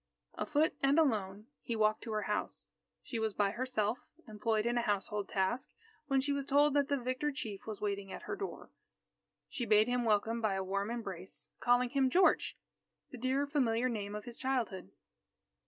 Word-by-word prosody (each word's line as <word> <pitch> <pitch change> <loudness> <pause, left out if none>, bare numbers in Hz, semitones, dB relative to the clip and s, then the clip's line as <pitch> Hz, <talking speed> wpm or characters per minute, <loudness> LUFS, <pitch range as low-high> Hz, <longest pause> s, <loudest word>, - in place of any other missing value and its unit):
Afoot 310 +1 +1
and 275 +2 +4
alone, 210 -9 +1 0.2
he 235 - -3
walked 215 0 +2
to 225 - -4
her 215 -1 0
house. 210 - -1 0.3
She 235 - -4
was 220 -2 -1
by 200 -1 +2
herself, 240 -2 -1 0.3
employed 215 0 0
in 240 0 +1
a 240 - +2
household 205 -2 -1
task, 200 +6 0 0.4
when 275 -2 +3
she 280 +2 0
was 280 -1 -2
told 290 +1 +4
that 285 -1 +3
the 285 - +2
victor 255 +4 -1
chief 220 -9 -6
was 215 -2 -5
waiting 200 -2 -2
at - - -7
her - - -3
door. 395 0 -6 0.8
She 245 - -4
bade 215 0 +5
him 245 0 +1
welcome 225 +1 +1
by 215 -3 +1
a 190 - -1
warm 200 +2 -1
embrace, 195 -6 -5
calling 245 0 +3
him 270 -2 +3
"George," 365 +8 +3 0.5
the 255 - -7
dear 260 +3 +1
familiar 255 -5 +1
name 205 -3 -3
of 210 - -6
his 240 -1 -8
childhood. 240 - -1
230 Hz, 185 wpm, -33 LUFS, 210-265 Hz, 0.8 s, bade